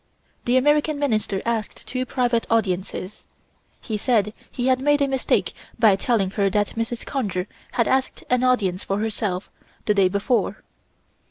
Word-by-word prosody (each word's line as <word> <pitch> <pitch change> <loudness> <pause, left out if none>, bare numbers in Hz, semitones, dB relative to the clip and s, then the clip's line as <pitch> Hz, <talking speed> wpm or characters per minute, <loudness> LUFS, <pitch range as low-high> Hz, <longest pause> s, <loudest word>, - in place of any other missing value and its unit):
The 245 +1 +3
American 295 +3 +3
Minister 215 -8 0
asked 230 -2 -3
two 255 0 -3
private 240 -3 0
audiences. 195 -2 -1 0.6
He 220 -3 -3
said 210 -3 +2 0.2
he 245 - -3
had 260 -1 +3
made 290 +2 +3
a 280 - +2
mistake 265 -1 0 0.2
by 220 -4 +5
telling 195 -2 +1
her 200 -1 +1
that 205 +1 +1
Mrs. 230 +1 -4
Conger 200 -10 -2 0.3
had 235 - +2
asked 265 0 0
an 250 0 +2
audience 205 -8 +2
for 195 - -1
herself, 210 -3 -2 0.3
the 210 - +3
day 195 -2 +4
before. 200 +6 0
230 Hz, 155 wpm, -23 LUFS, 200-255 Hz, 0.6 s, by